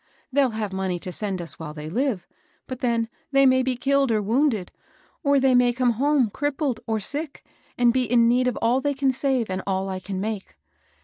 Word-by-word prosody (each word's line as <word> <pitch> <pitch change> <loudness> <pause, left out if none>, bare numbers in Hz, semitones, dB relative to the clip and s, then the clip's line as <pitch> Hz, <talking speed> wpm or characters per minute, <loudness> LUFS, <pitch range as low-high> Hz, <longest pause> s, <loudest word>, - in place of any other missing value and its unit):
They'll 275 -1 +4
have 210 -3 -3
money 190 -2 -1
to 180 +1 -6
send 190 -2 -3
us 165 - -7
while 155 -2 -7
they 150 0 -7
live; 215 - -1 0.4
but 255 -1 -7
then 235 -2 0 0.2
they 275 0 +5
may 260 0 +5
be 260 0 0
killed 275 +1 +1
or 220 - +2
wounded, 220 -2 0 0.5
or 280 -3 +3
they 265 -1 +3
may 245 -1 +4
come 250 0 +2
home 265 -1 +2
crippled 290 -2 -1
or 220 -1 0
sick 285 +7 -4 0.3
and 240 -1 +4
be 255 0 +1
in 235 -1 +5
need 250 +2 +3
of 250 - -1
all 245 +3 +3
they 285 0 -1
can 270 -1 +2
save 260 -3 0
and 185 0 -3
all 190 0 -1
I 190 -1 -3
can 190 0 -5
make. 205 - -5
245 Hz, 210 wpm, -24 LUFS, 200-270 Hz, 0.5 s, they